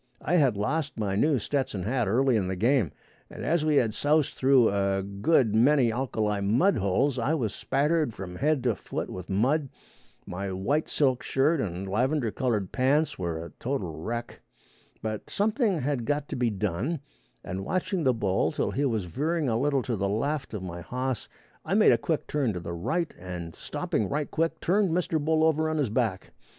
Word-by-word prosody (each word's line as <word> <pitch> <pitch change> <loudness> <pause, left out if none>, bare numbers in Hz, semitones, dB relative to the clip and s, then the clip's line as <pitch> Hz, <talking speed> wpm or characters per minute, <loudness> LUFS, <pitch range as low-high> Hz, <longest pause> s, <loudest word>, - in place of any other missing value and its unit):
I 175 - +1
had 135 -9 +3
lost 140 +6 -1
my 100 -3 -1
new 145 +7 +3
Stetson 125 -5 -2
hat 120 +1 0
early 125 +5 +3
in 100 -4 +1
the 95 - -2
game, 115 - +2 0.4
and, - - -7
as 165 0 +2
we 155 -1 +2
had 115 -6 +3
soused 150 +3 +2
through 130 -3 +4
a 100 -1 0
good 105 +4 +2
many 125 +1 +4
alkali 110 -5 -1
mud 125 - +3
holes, 115 +7 +1
I 140 +7 +1
was 115 -9 -1
spattered 150 +1 +1
from 90 -4 -8
head 150 -1 +1
to 120 -3 +2
foot - - -5
with 90 -1 -7
mud. 130 +9 +1 0.6
My 95 +2 -4
white 135 +12 -1
silk 130 -4 +2
shirt 145 +3 +1
and 95 -1 -4
lavender 125 +4 0
colored 110 -8 -1
pants 140 +2 +1
were 85 -2 -3
a - - -10
total 115 - -2
wreck. 120 +6 -5 0.6
But 110 -1 -4
something 210 - +1
had 130 -3 -1
got 145 +2 -1
to - - -3
be 125 -2 +1
done, 110 - -2 0.4
and 95 +2 -4
watching 185 - -1
the 130 - +4
bull 100 -5 0
till - - -1
he 145 - 0
was 110 -7 0
veering 150 - -1
a 115 0 +1
little 140 -1 +1
to 120 - -2
the 100 -1 -1
left 135 +4 -2
of 100 - -5
my 85 -1 -6
hoss 125 +5 -3 0.3
I 180 - -1
made 215 - +6
a 120 - +4
quick 160 +5 -1
turn 135 -7 0
to 90 - -4
the 85 0 -6
right, 160 - -2
and 85 -2 -7
stopping 105 - -2
right 145 +1 -2
quick, 165 +1 0
turned 195 +2 +2
Mr. 160 -2 0
Bull 160 +1 +2
over 160 0 +2
on 155 - -1
his 140 -6 +1
back. 110 -5 -1
125 Hz, 195 wpm, -27 LUFS, 100-150 Hz, 0.6 s, made